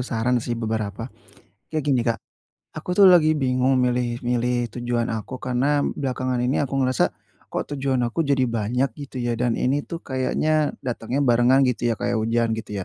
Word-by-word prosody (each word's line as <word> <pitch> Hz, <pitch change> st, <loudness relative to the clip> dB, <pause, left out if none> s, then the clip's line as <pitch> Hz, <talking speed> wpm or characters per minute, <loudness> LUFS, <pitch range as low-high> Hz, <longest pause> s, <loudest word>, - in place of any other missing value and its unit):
saran 125 Hz, 0 st, 0 dB
sih 120 Hz, +1 st, -3 dB
beberapa. 110 Hz, +1 st, -3 dB, 0.5 s
Kayak 155 Hz, -2 st, -3 dB
gini 130 Hz, -, +3 dB
Kak, 115 Hz, -1 st, +1 dB, 0.6 s
aku 175 Hz, +3 st, -4 dB
tuh 195 Hz, +1 st, +7 dB
lagi 165 Hz, -4 st, +6 dB
bingung 130 Hz, -2 st, +1 dB
milih 125 Hz, -1 st, 0 dB
milih 120 Hz, 0 st, 0 dB
tujuan 120 Hz, -1 st, -1 dB
aku 115 Hz, +3 st, -5 dB
karena 135 Hz, +3 st, +1 dB
belakangan 130 Hz, -2 st, -2 dB
ini 125 Hz, +3 st, +1 dB
aku 135 Hz, -1 st, -2 dB
ngerasa 130 Hz, -2 st, +2 dB, 0.4 s
kok -, -, -2 dB
tujuan 135 Hz, -3 st, 0 dB
aku 120 Hz, +7 st, -2 dB
jadi 135 Hz, -2 st, +3 dB
banyak 120 Hz, +2 st, -1 dB
gitu 140 Hz, -1 st, -10 dB
ya, 120 Hz, -1 st, -1 dB
dan 120 Hz, -2 st, +1 dB
ini 140 Hz, +3 st, +1 dB
tuh 170 Hz, +3 st, -8 dB
kayaknya 150 Hz, +3 st, 0 dB
datangnya 125 Hz, +3 st, -2 dB
barengan 125 Hz, +2 st, +4 dB
gitu 125 Hz, -1 st, 0 dB
ya 115 Hz, -, +1 dB
kayak 120 Hz, 0 st, -1 dB
hujan 115 Hz, +1 st, +1 dB
gitu 105 Hz, -3 st, -4 dB
125 Hz, 175 wpm, -23 LUFS, 120-135 Hz, 0.6 s, tuh